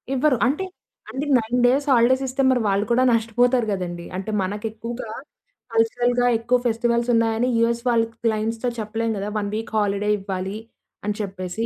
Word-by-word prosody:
ఇవ్వరు. 270 Hz, -1 st, +3 dB
అంటే 305 Hz, +8 st, -1 dB, 0.5 s
అంటే 270 Hz, +3 st, -3 dB
9 240 Hz, +2 st, -1 dB
డేస్ 270 Hz, +4 st, +3 dB
హాలిడేస్ 255 Hz, +2 st, +4 dB
ఇస్తే 260 Hz, +1 st, -1 dB
మరి 250 Hz, -2 st, +3 dB
వాళ్ళు 200 Hz, +1 st, +1 dB
కూడా 240 Hz, +2 st, +3 dB
నష్టపోతారు 235 Hz, +2 st, +2 dB
గదండీ! 175 Hz, -2 st, -4 dB
అంటే 195 Hz, +3 st, -4 dB
మనకెక్కువగా 220 Hz, +4 st, -5 dB, 0.6 s
కల్చరల్‌గా 245 Hz, +2 st, +2 dB
ఎక్కువ 240 Hz, +2 st, +2 dB
ఫెస్టివల్స్ 235 Hz, +1 st, +1 dB
ఉన్నాయని 230 Hz, +2 st, +2 dB
యూఎస్ 235 Hz, 0 st, +1 dB
వాళ్ళ 230 Hz, -1 st, +3 dB
క్ -, -, -28 dB
క్లయింట్స్‌‌తో 225 Hz, +2 st, 0 dB
చెప్పలేం 225 Hz, +1 st, -2 dB
గదా! 200 Hz, +1 st, -3 dB
1 205 Hz, -1 st, -2 dB
వీక్ 225 Hz, +1 st, -5 dB
హాలిడే 205 Hz, 0 st, 0 dB
ఇవ్వాలి 195 Hz, +1 st, -4 dB, 0.5 s
అని 210 Hz, -, -1 dB
చెప్పేసి. 190 Hz, +2 st, -4 dB
230 Hz, 155 wpm, -23 LUFS, 210-245 Hz, 0.6 s, హాలిడేస్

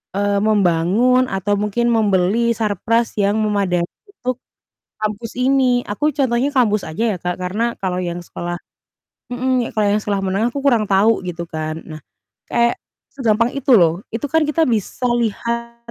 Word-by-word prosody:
eee, 200 Hz, 0 st, +1 dB
membangun 210 Hz, +5 st, +3 dB
atau 195 Hz, +2 st, 0 dB
mungkin 210 Hz, +4 st, 0 dB
membeli 215 Hz, +1 st, +2 dB
sarpras 225 Hz, +2 st, 0 dB
yang 205 Hz, +2 st, +2 dB
memadai 200 Hz, -5 st, +1 dB, 0.2 s
untuk 255 Hz, -, -4 dB, 0.6 s
kampus 215 Hz, +2 st, -3 dB
ini. 255 Hz, -2 st, +3 dB
Aku 295 Hz, +9 st, 0 dB
contohnya 260 Hz, 0 st, +1 dB
kampus 215 Hz, -6 st, +2 dB
aja 210 Hz, +6 st, -1 dB
ya, -, -, -6 dB
Kak, 180 Hz, 0 st, -2 dB
karena 220 Hz, +6 st, -1 dB
kalau 185 Hz, -2 st, -2 dB
yang 175 Hz, -1 st, -3 dB
sekolah 175 Hz, 0 st, -5 dB, 0.7 s
mhm, 250 Hz, 0 st, -1 dB
kalau 215 Hz, -1 st, +2 dB
yang 210 Hz, -, +2 dB
sekolah 200 Hz, -2 st, -2 dB
menengah 200 Hz, +6 st, 0 dB
aku 280 Hz, -, -3 dB
kurang 235 Hz, -7 st, +3 dB
tahu 205 Hz, +3 st, +3 dB
gitu 170 Hz, -1 st, -5 dB
kan. 155 Hz, 0 st, -4 dB
Nah, 155 Hz, -1 st, -10 dB, 0.5 s
kayak 235 Hz, 0 st, +1 dB, 0.3 s
segampang 235 Hz, -2 st, +1 dB
itu 275 Hz, -2 st, +2 dB
loh. 170 Hz, -1 st, +3 dB
Itu 260 Hz, +5 st, -3 dB
kan 320 Hz, -2 st, +2 dB
kita 310 Hz, +2 st, +1 dB
bisa 230 Hz, +2 st, -1 dB
lihat 235 Hz, +1 st, -2 dB
215 Hz, 155 wpm, -19 LUFS, 190-240 Hz, 0.7 s, membangun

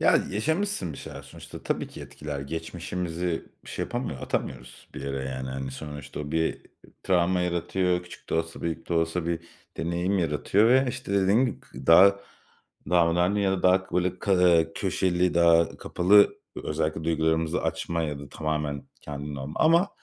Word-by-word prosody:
Ya, -, -, +5 dB
yaşamışsın 155 Hz, -, -1 dB
bir -, -, -9 dB
şeyler -, -, -8 dB
sonuçta. -, -, -11 dB
Tabii -, -, -2 dB
ki -, -, -11 dB
etkiler. 75 Hz, -2 st, -6 dB
Geçmişimizi 85 Hz, +3 st, -4 dB, 0.2 s
şey -, -, -4 dB
yapamıyo 120 Hz, -, -4 dB
atamıyoruz 65 Hz, -1 st, -5 dB
bir -, -, -6 dB
yere, 70 Hz, -1 st, -3 dB
yani, 65 Hz, 0 st, -4 dB
hani, 65 Hz, 0 st, -4 dB
sonuçta. 75 Hz, +1 st, -7 dB
O 75 Hz, 0 st, -6 dB
bir 80 Hz, 0 st, 0 dB, 0.4 s
travma 90 Hz, -1 st, +2 dB
yaratıyor. 90 Hz, +1 st, 0 dB
Küçük 90 Hz, -, -13 dB
de -, -, 0 dB
olsa, 80 Hz, 0 st, -2 dB
büyük 85 Hz, 0 st, -4 dB
de 85 Hz, -, 0 dB
olsa 80 Hz, +1 st, 0 dB
bir 85 Hz, -1 st, -1 dB, 0.4 s
deneyim 85 Hz, +4 st, 0 dB
yaratıyor 90 Hz, +6 st, +2 dB
ve, 130 Hz, +2 st, +5 dB
işte, 125 Hz, -4 st, -5 dB
dediğim 100 Hz, +5 st, +4 dB
gibi, 120 Hz, -, -5 dB
k 65 Hz, +1 st, -12 dB
daha 100 Hz, +4 st, +7 dB, 0.7 s
daha 85 Hz, -2 st, +4 dB
önemli 90 Hz, +4 st, +2 dB
ya 95 Hz, -, +2 dB
da 95 Hz, -, -2 dB
daha 95 Hz, +1 st, +4 dB
k -, -, -10 dB
böyle, 90 Hz, 0 st, 0 dB, 0.6 s
köşeli, 90 Hz, -2 st, +1 dB
daha 85 Hz, -1 st, +4 dB
kapalı 90 Hz, +4 st, +3 dB, 0.4 s
ö -, -, -4 dB
özellikle 80 Hz, +1 st, -1 dB
duygularımızı 80 Hz, 0 st, +1 dB
açmaya 85 Hz, -2 st, -1 dB
ya 75 Hz, -1 st, -4 dB
da 70 Hz, 0 st, -9 dB
tamamen 75 Hz, -2 st, -3 dB, 0.2 s
kendinle 70 Hz, -1 st, -6 dB
olma 70 Hz, +3 st, -5 dB
Ama 170 Hz, +5 st, +5 dB
85 Hz, 170 wpm, -26 LUFS, 75-95 Hz, 0.7 s, daha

